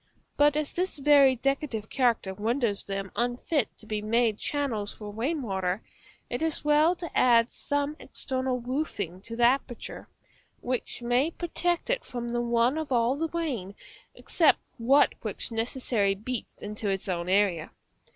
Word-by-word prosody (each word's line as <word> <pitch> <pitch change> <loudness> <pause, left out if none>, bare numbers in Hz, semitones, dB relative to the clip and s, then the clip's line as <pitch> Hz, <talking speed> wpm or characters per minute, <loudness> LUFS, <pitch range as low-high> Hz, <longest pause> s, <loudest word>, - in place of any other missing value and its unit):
But 295 0 +4
as 305 -1 -2
this 365 -1 -1
very 280 -2 +6
decorative 260 -4 -1
character 235 -7 +1
renders 220 +1 0
them 195 -1 -4
unfit 245 +4 0
to - - -12
be 215 -1 -3
made 225 0 +1
channels 240 -9 -1
for 210 -1 -8
rain 265 +8 -2
water, 190 -2 -2 0.4
it 245 - -4
is 320 -2 -1
well 305 +4 +4
to 340 -2 -8
add 235 -1 +5
some 285 +1 -2
external 260 -2 -2
roofing 235 - -3
to 230 +3 -7
the 240 - 0
aperture, 245 0 0 0.5
which 245 -1 -3
may 245 +5 +2
protect 345 +3 -1
it - - 0
from 240 -1 -5
the 240 0 -1
run 240 +4 +2
of 310 -3 -5
all 240 +1 +3
the 325 +3 -2
rain, 260 - -3 0.4
except 320 -4 +3 0.2
that 270 +5 +5
which - - -4
necessarily 225 -3 0
beats 230 +4 -5
into 210 0 -4
its 195 +1 -2
own 175 -1 -2
area. 190 -5 +2
245 Hz, 155 wpm, -28 LUFS, 215-285 Hz, 0.5 s, very